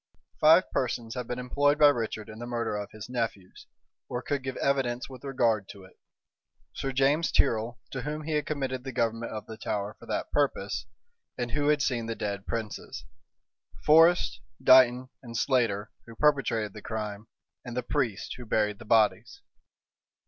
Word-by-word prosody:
Five 160 +4 +7
persons 120 -2 -2
had 125 -2 -5
been 125 - -3
employed 145 +4 +2
by 150 -1 +8
Richard 110 -5 -2
in 110 0 -10
the 120 - -6
murder 115 -3 -2
of 105 -1 -4
his 110 0 -9
nephews, 115 -7 -4 0.4
or 125 0 -3
could 140 0 -1
give 130 0 -5
evidence 130 -3 0
with 130 -1 -12
regard 115 -7 +1
to 100 -2 -11
it; 95 - -18 0.7
Sir 135 - -3
James 140 +5 +2
Tyrrel, 115 +1 +1
to 135 - -4
whom 150 +3 -4
he 160 - -4
had 150 -1 0
committed 135 -4 -2
the 135 - -5
government 115 0 -1
of 110 -2 -6
the 110 - -9
Tower 105 0 -3
for - - -14
that - - -3
purpose, 125 -7 0 0.5
and 120 -1 -3
who 145 +2 0
had 150 -2 +3
seen 120 -5 -1
the 115 - -3
dead 100 -2 -4
princes; 115 -3 -5 0.8
Forrest, 155 -8 +5 0.2
Dighton, 130 0 +6
and 115 -3 -7
Slater, 110 -6 +1 0.2
who 115 - -11
perpetrated 125 -8 +1
the 105 - -9
crime; 105 0 -5 0.4
and 125 -1 -7
the 125 - 0
priest 115 -8 -1
who 125 - -9
buried 105 -1 +1
the 120 - -11
bodies. 110 -1 +2
120 Hz, 175 wpm, -28 LUFS, 110-135 Hz, 0.8 s, by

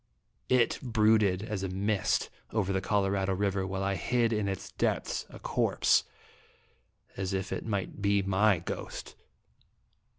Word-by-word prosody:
It 125 -3 +3
brooded 110 -5 +3
as 105 -3 -3
a 95 - -2
mist 100 +2 0 0.2
over 100 -3 0
the 95 - 0
Colorado 95 -1 +1
River 95 -1 0
while 95 0 -3
I 100 0 +1
hid 115 +5 +1
in 105 -2 0
its 95 -1 -4
depths - - -1
a - - -10
corpse - - +2 1.1
as 95 0 -2
if 95 0 -2
it - - -4
might 100 -1 -3
be 100 0 +2
my 100 +1 +3
ghost. 85 - -6
100 Hz, 140 wpm, -30 LUFS, 95-110 Hz, 1.1 s, It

